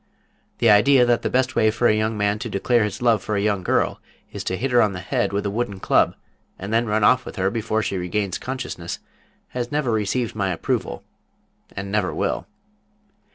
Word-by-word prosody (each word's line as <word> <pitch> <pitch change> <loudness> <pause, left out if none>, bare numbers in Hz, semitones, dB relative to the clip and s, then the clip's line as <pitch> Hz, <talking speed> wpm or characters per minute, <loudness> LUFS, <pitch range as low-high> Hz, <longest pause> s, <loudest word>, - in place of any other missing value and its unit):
The 115 - +4
idea 125 +5 +6
that 120 -1 +2
the - - -1
best 130 0 +1
way 110 - +4
for 110 +3 +1
a - - +4
young 110 0 -1
man 105 0 0
to 115 - -5
declare 110 +4 +2
his 105 +3 -5
love 115 -3 +3
for 105 - -3
a - - +1
young 100 -1 0
girl 90 - 0 0.3
is - - -6
to 95 - -1
hit 130 +5 -2
her 120 -1 +5
on 105 -3 +2
the 90 - -5
head 90 - -1
with 100 +1 -2
a 100 - -1
wooden 105 -3 -3
club - - +2 0.4
and 100 +3 -5
then 115 +1 +2
run 105 0 +1
off 130 +3 +5
with - - -9
her 95 -1 0
before 110 -1 -1
she 100 - -2
regains 95 +1 -2
consciousness 125 -10 -5 0.5
has 120 -1 -4
never 145 -4 0
received 110 +2 -1
my 100 -3 -1
approval, 90 - -2 0.7
and 100 0 -5
never 105 -3 0
will. - - -2
110 Hz, 210 wpm, -22 LUFS, 100-120 Hz, 0.7 s, idea